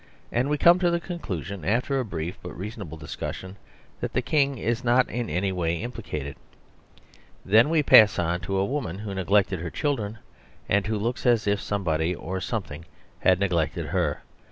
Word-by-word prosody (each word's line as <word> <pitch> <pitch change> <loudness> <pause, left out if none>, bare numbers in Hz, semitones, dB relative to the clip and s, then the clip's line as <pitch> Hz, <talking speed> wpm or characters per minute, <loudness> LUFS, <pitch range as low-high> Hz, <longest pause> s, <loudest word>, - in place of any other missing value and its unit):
And 125 +4 +1
we 150 - +1
come 170 +4 +6
to 175 -1 +3
the 170 0 +1
conclusion, 100 - -5
after 125 - +1
a - - 0
brief 85 -5 -5
but - - -8
reasonable 95 -4 -7
discussion, 90 +4 -6 0.4
that - - -4
the 125 - +1
King 140 -1 +1
is 120 +3 -1
not 125 +1 +4
in 120 -1 -3
any 95 +5 0
way 85 -2 0
implicated. 95 - -5 1.1
Then 110 +8 +5
we 160 -2 +3
pass 110 -6 +7
on 85 0 0
to 95 +2 -3
a 95 - +2
woman 115 - -3
who 105 -1 -5
neglected 95 0 +2
her 85 +1 -4
children, 115 - -2 0.5
and 100 +1 +2
who 110 -1 0
looks 120 +5 -2
as 120 -2 +3
if 100 0 +1
somebody 90 -4 -1
or 95 +2 -5
something 85 -7 -4 0.3
had 95 -1 +3
neglected 85 -6 0
her. - - -1
100 Hz, 180 wpm, -26 LUFS, 90-120 Hz, 1.1 s, pass